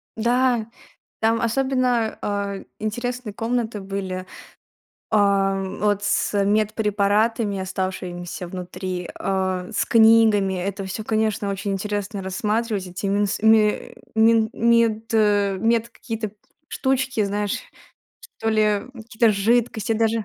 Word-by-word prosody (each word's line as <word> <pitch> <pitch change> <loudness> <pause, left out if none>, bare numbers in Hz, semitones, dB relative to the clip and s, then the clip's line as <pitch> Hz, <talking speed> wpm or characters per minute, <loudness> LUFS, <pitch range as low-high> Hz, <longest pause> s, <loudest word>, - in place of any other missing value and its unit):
Да, 240 0 +1 0.5
там 225 +1 +2
особенно, 250 -1 +1
а, 200 -1 -2 0.2
интересные 240 +1 -3
комнаты 225 0 -2
были. 190 -1 -4 0.8
А, 195 -2 +2 0.2
вот 205 -1 +1
с - - 0
медпрепаратами, 210 0 +1
оставшимися 185 -1 -4
внутри, 180 0 -5
а, 185 -1 -2
с 210 - 0
книгами. 220 -4 +5
Это 195 +2 -3
всё, 190 +3 -5
конечно, 215 -2 0
очень 200 +1 -3
интересно 205 0 -3
рассматривать. 210 +1 -1
Эти 185 +3 -4
минс 200 0 0
мэ 220 -1 +3 0.2
мин 225 0 +4
мед 230 -1 +2
мед 215 +2 +2
какие-то 220 -3 -5 0.4
штучки, 265 -4 0
знаешь, 205 0 -1 0.8
что 225 - 0
ли 215 -2 +2
какие-то 225 -1 +1
жидкости 225 +1 +1
даже. 225 0 +1
210 Hz, 105 wpm, -23 LUFS, 195-225 Hz, 0.8 s, книгами